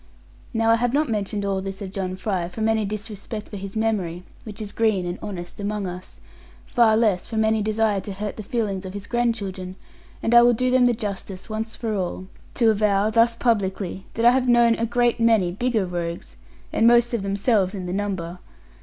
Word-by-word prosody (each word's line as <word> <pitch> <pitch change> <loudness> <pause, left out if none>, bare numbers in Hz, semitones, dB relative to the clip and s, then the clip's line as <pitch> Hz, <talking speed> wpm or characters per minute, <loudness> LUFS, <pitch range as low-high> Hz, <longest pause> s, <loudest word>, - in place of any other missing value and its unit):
Now 225 -1 +2
I 230 - +5
have 245 +1 0
not 300 -2 +1
mentioned 205 -1 -2
all 195 -1 0
this 195 0 -6
of 195 -3 -6
John 185 -1 -3
Fry, 185 -2 -2
from 220 +4 -2
any 220 -1 +1
disrespect 210 +1 -6
for 205 - -6
his 195 +1 -7
memory 195 -6 -1 0.2
(which 210 -3 -8
is 210 -2 -5
green 215 -5 +1
and 175 +1 -4
honest 175 -3 -7
amongst 205 -1 -2
us), 180 +1 -10 0.5
far 225 -3 +4
less 210 -6 +1
from 220 -1 0
any 220 0 +2
desire 215 -1 +1
to 200 - -6
hurt 205 +1 -4
the - - -6
feelings 205 -3 -2
of 190 +1 -7
his 205 0 -6
grandchildren; 200 -7 -2 0.5
and 225 - +1
I 235 - +9
will 240 0 +5
do 255 +2 0
them 255 -1 +5
the 245 - +3
justice, 200 -2 -6
once 220 +1 -4
for 225 -2 -3
all, 185 -1 -3 0.3
to 230 -3 +4
avow, 210 0 +2
thus 230 +1 +4
publicly, 195 -5 -1
that 230 - 0
I 240 - +9
have 255 0 +1
known 235 -1 +5
a 230 0 -1
great 240 0 +1
many 225 -6 +3
bigger 220 +1 0
rogues, 170 -1 -5 0.4
and 225 - +4
most 240 0 +5
of 235 - 0
themselves 200 0 +1
in 185 -2 -5
the 180 - -3
number. 185 -3 -3
210 Hz, 205 wpm, -23 LUFS, 190-230 Hz, 0.5 s, I